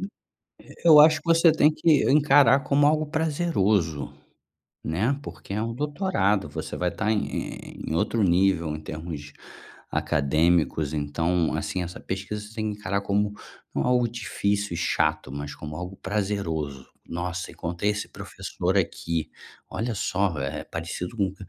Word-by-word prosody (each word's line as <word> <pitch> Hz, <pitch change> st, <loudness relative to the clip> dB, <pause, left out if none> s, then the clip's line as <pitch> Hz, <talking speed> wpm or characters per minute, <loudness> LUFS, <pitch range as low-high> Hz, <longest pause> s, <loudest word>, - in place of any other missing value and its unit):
Eh, 195 Hz, -, -3 dB, 0.8 s
eu 150 Hz, -2 st, +10 dB
acho 155 Hz, +1 st, +7 dB
que -, -, -34 dB
você 165 Hz, 0 st, +6 dB
tem 155 Hz, 0 st, +4 dB
que 155 Hz, -2 st, +3 dB
encarar 140 Hz, -1 st, +6 dB
como 145 Hz, +1 st, +3 dB
algo 155 Hz, 0 st, +2 dB
prazeroso, 140 Hz, -, 0 dB, 0.7 s
né, 110 Hz, -, 0 dB
porque -, -, -9 dB
é 105 Hz, +2 st, -1 dB
um 115 Hz, 0 st, -3 dB
doutorado, 140 Hz, -, 0 dB
você -, -, -5 dB
vai 90 Hz, -, 0 dB
estar 110 Hz, +5 st, -1 dB
em 105 Hz, -2 st, -3 dB
em 80 Hz, -, -2 dB
outro 110 Hz, +6 st, +1 dB
nível 85 Hz, -3 st, +2 dB
em 80 Hz, -, -10 dB
termos 80 Hz, -2 st, -7 dB, 0.6 s
acadêmicos, 75 Hz, 0 st, +1 dB
então, 80 Hz, +3 st, 0 dB
assim, 90 Hz, -, -2 dB
essa 90 Hz, 0 st, -6 dB
pesquisa 95 Hz, +2 st, -4 dB
você 110 Hz, -, -14 dB
tem 110 Hz, -2 st, -2 dB
que 105 Hz, -, -9 dB
encarar 100 Hz, -1 st, -1 dB
como 100 Hz, +1 st, 0 dB, 0.4 s
não -, -, 0 dB
algo 125 Hz, -1 st, +3 dB
difícil 100 Hz, -3 st, -2 dB
e -, -, -3 dB
chato, 75 Hz, -4 st, 0 dB
mas 70 Hz, 0 st, -5 dB
como 75 Hz, 0 st, -8 dB
algo 90 Hz, +3 st, -6 dB
prazeroso: 85 Hz, -9 st, -2 dB, 0.2 s
"Nossa, 90 Hz, +2 st, -4 dB
encontrei 85 Hz, +4 st, -2 dB
esse 105 Hz, 0 st, -3 dB
professor -, -, -3 dB
aqui, 85 Hz, -1 st, -2 dB, 0.4 s
olha 115 Hz, 0 st, -3 dB
só, 95 Hz, -4 st, 0 dB
eh, 70 Hz, 0 st, -3 dB
parecido 85 Hz, +6 st, -5 dB
com", 95 Hz, -3 st, 0 dB
95 Hz, 150 wpm, -25 LUFS, 85-120 Hz, 0.8 s, eu